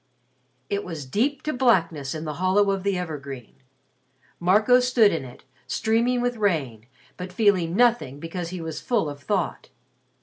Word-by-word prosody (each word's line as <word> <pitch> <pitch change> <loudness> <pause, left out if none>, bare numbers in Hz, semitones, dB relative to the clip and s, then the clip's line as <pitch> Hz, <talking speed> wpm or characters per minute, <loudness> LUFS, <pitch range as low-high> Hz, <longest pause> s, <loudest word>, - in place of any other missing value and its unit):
It 200 0 -2
was 160 -6 -6
deep 255 - -1
to 305 - -2
blackness 170 - +1
in 155 +1 -5
the 155 - -3
hollow 195 +2 +3
of 195 -1 -1
the 200 -1 0
evergreen. 140 -8 -6 0.9
Marco 210 +8 +4
stood 250 -4 +4
in 160 - -2
it, 125 -1 -12 0.2
streaming 235 +3 +1
with 245 -1 -1
rain, 140 - -1 0.3
but 180 0 -6
feeling 185 -4 +2
nothing 235 - +2
because 165 +2 -5
he 180 -1 -6
was 160 -1 -5
full 230 -10 0
of 145 0 -11
thought. 175 -4 -2
185 Hz, 160 wpm, -24 LUFS, 155-220 Hz, 0.9 s, Marco